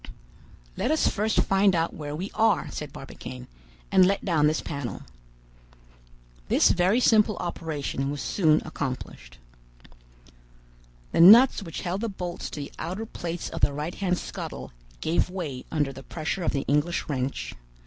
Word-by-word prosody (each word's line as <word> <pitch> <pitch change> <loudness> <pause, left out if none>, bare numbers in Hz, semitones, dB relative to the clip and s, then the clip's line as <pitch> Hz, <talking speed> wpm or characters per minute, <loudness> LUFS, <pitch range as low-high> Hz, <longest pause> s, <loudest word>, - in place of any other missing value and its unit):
"Let - - 0
us 310 +1 +2
first 215 +1 +1
find 195 -1 +3
out 165 0 0
where 145 -1 -6
we 185 +6 -5
are," 225 0 +2
said - - -6
Barbicane, 65 -1 -9 0.5
"and 185 - +6
let 195 +2 +1
down 160 -6 +3
this 155 +1 +1
panel." 140 -9 -5 1.4
This - - +4
very 185 +6 +3
simple 215 -4 +4
operation 150 -5 -3
was 145 0 -4
soon 155 0 +2
accomplished. 130 - -6 1.7
The - - +3
nuts 225 +8 +8
which 165 -5 -6
held 185 +2 -3
the 230 - -1
bolts 180 -3 -5
to 150 - -6
the 140 - -7
outer 185 +7 -4
plates 175 -5 -5
of - - -6
the 145 - +3
right 150 +4 -4
hand 180 -3 -1
scuttle 65 - -7 0.3
gave 165 +3 +1
way 160 -9 -5
under 145 -3 -1
the 135 - -10
pressure 160 +6 -4
of 170 - 0
the 140 - -2
English 150 +4 +1
wrench. 135 -2 -3
165 Hz, 155 wpm, -26 LUFS, 145-190 Hz, 1.7 s, nuts